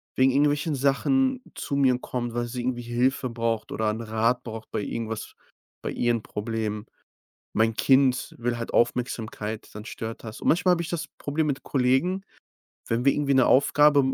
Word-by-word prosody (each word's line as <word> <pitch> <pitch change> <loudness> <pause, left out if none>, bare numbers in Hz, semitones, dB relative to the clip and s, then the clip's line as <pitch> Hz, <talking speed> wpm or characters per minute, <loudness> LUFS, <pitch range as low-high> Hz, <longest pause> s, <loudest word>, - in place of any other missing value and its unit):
wegen 130 0 +4
irgendwelchen 145 +2 +2
Sachen 255 - +2
zu 140 - -3
mir 130 -3 +4
kommt, 120 -2 -4
weil 120 0 -1
sie 125 +1 -4
irgendwie 120 0 -2
Hilfe 125 +2 0
braucht 115 -2 -2
oder 110 0 0
'n 110 +2 -3
Rat 115 +2 0
braucht 110 -1 -8
bei - - -1
irgendwas, 110 0 -4 0.5
bei - - -2
ihren 120 -2 0
Problemen. 105 0 -3 0.7
Mein 110 0 +2
Kind 130 -2 +3
will 120 0 -1
halt 115 - -5
Aufmerksamkeit, 110 -3 -1
dann 105 +1 -8
stört 115 +1 -6
das. 110 -1 -8
Und - - -3
manchmal 180 +2 +4
habe 170 - 0
ich - - -6
das 170 -3 -3
Problem 150 +2 -1
mit 135 -2 -1
Kollegen, 140 +9 +1 0.7
wenn 115 +2 0
wir 140 - +5
irgendwie 140 -2 +1
'ne 130 - +5
Aufgabe, 145 +2 +5
125 Hz, 175 wpm, -26 LUFS, 115-140 Hz, 0.7 s, wir